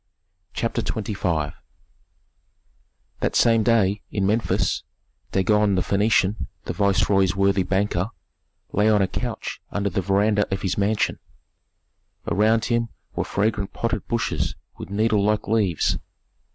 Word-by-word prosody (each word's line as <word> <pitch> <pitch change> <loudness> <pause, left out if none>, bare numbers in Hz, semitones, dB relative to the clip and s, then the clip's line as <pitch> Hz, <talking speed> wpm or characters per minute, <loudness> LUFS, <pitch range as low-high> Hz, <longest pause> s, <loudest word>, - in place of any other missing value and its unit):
CHAPTER 115 - -1
XXV 90 -9 -2 1.7
That - - -1
same 115 -1 +4
day, 105 -2 +2
in 100 -2 -1
Memphis, 110 +3 +1 0.5
Dagon 105 +1 +3
the 90 - +1
Phœnician, 100 - +1 0.2
the - - -3
viceroy's 95 -2 +2
worthy 100 0 +3
banker, 95 0 0 0.6
lay 105 +2 +3
on 105 -2 +4
a - - +1
couch 120 +4 -4
under 100 -1 -1
the 95 - 0
veranda 100 +2 +2
of 95 - -2
his 95 - 0
mansion. 105 +1 0 1.1
Around 110 +2 +2
him 115 -1 0 0.3
were - - 0
fragrant 105 -1 -1
potted 115 - -2
bushes 115 -2 -1 0.2
with - - -9
needle 105 0 +2
like 105 0 +1
leaves. 100 -6 +1
100 Hz, 125 wpm, -23 LUFS, 95-110 Hz, 1.7 s, same